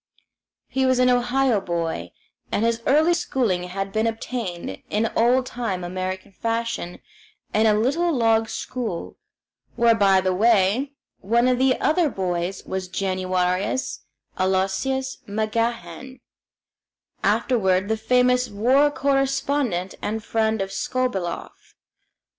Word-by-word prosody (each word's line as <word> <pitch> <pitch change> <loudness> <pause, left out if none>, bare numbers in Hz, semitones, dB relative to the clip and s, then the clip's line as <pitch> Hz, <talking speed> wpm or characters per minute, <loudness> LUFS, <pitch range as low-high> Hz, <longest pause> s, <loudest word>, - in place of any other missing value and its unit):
He 265 0 0
was 255 -1 +3
an 250 0 +4
Ohio 245 -2 +2
boy, 165 - -3 0.4
and 220 - +1
his 230 0 0
early 310 +5 +4
schooling 240 - 0
had 195 +2 -4
been 220 +1 +1
obtained 220 - -4
in 220 +2 0
old 250 +3 +3
time 225 -8 -3
American 185 +2 -4
fashion 230 -4 -3 0.6
in 220 +1 +4
a 210 - +4
little 285 +11 +1
log 225 -5 +2
school; 230 -9 -4 0.6
where, 235 0 +4
by 200 -3 +4
the 185 0 0
way, 225 +6 +2 0.3
one 235 +5 +2
of 250 -1 +2
the 260 0 +3
other 315 0 +2
boys 180 -2 -3
was 190 -1 -4
Januarius 185 +3 -1 0.4
Aloysius 190 +8 0
MacGahan, 230 +4 -3 1.0
afterward 190 -6 +2
the 220 - +1
famous 250 +2 +2
war 255 +8 +3
correspondent 275 -8 0
and 220 +1 -3
friend 220 -2 0
of 195 - -7
Skobeloff. 195 -7 -3
225 Hz, 120 wpm, -23 LUFS, 190-255 Hz, 1.0 s, an